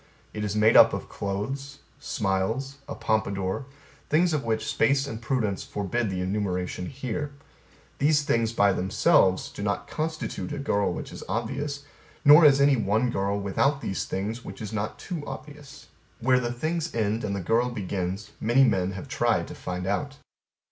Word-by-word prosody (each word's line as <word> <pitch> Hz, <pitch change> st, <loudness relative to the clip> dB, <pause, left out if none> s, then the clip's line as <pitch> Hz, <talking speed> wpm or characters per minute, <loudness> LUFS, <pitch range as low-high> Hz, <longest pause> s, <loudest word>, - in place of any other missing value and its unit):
It 105 Hz, -, -4 dB
is 105 Hz, -1 st, -2 dB
made 105 Hz, +1 st, +4 dB
up -, -, +8 dB
of -, -, -4 dB
clothes, 135 Hz, +8 st, -4 dB, 0.2 s
smiles, 110 Hz, +8 st, -1 dB
a -, -, -5 dB
pompadour, 100 Hz, +2 st, -1 dB, 0.4 s
things 170 Hz, +2 st, +3 dB
of 150 Hz, -, 0 dB
which 110 Hz, -1 st, -1 dB
space 140 Hz, 0 st, +2 dB
and 115 Hz, -5 st, -6 dB
prudence 115 Hz, -5 st, -1 dB
forbid 105 Hz, +3 st, -2 dB
the 95 Hz, -1 st, -2 dB
enumeration 90 Hz, -2 st, -2 dB
here. 135 Hz, +2 st, -4 dB, 0.7 s
These 150 Hz, +1 st, +3 dB
things 115 Hz, -4 st, +1 dB
by 100 Hz, -3 st, +3 dB
themselves 95 Hz, 0 st, +3 dB
do -, -, -8 dB
not 100 Hz, 0 st, -2 dB
constitute 155 Hz, -1 st, -3 dB
a -, -, -4 dB
girl 105 Hz, -9 st, 0 dB
which -, -, -6 dB
is -, -, -8 dB
obvious; 140 Hz, +5 st, -3 dB, 0.4 s
nor 150 Hz, +3 st, +9 dB
is 140 Hz, -2 st, +7 dB
any 140 Hz, -1 st, +5 dB
one 110 Hz, +3 st, +1 dB
girl 100 Hz, 0 st, -1 dB
without 135 Hz, +8 st, +1 dB
these 95 Hz, -, -2 dB
things 110 Hz, +6 st, -3 dB
which -, -, -9 dB
is 110 Hz, -2 st, -6 dB
not 105 Hz, 0 st, -3 dB
too 170 Hz, -5 st, -5 dB
obvious. 145 Hz, +1 st, -9 dB, 0.3 s
Where 130 Hz, +1 st, +3 dB
the 120 Hz, -1 st, -2 dB
things 155 Hz, +6 st, -2 dB
end 110 Hz, 0 st, 0 dB
and 100 Hz, -2 st, -2 dB
the -, -, -2 dB
girl 115 Hz, +7 st, +1 dB
begins 100 Hz, -2 st, -4 dB
many 120 Hz, +5 st, +4 dB
men 95 Hz, -6 st, +2 dB
have 95 Hz, -, -7 dB
tried -, -, +1 dB
to -, -, -7 dB
find 90 Hz, 0 st, -5 dB
out. 135 Hz, +8 st, -2 dB
115 Hz, 170 wpm, -26 LUFS, 100-140 Hz, 0.7 s, nor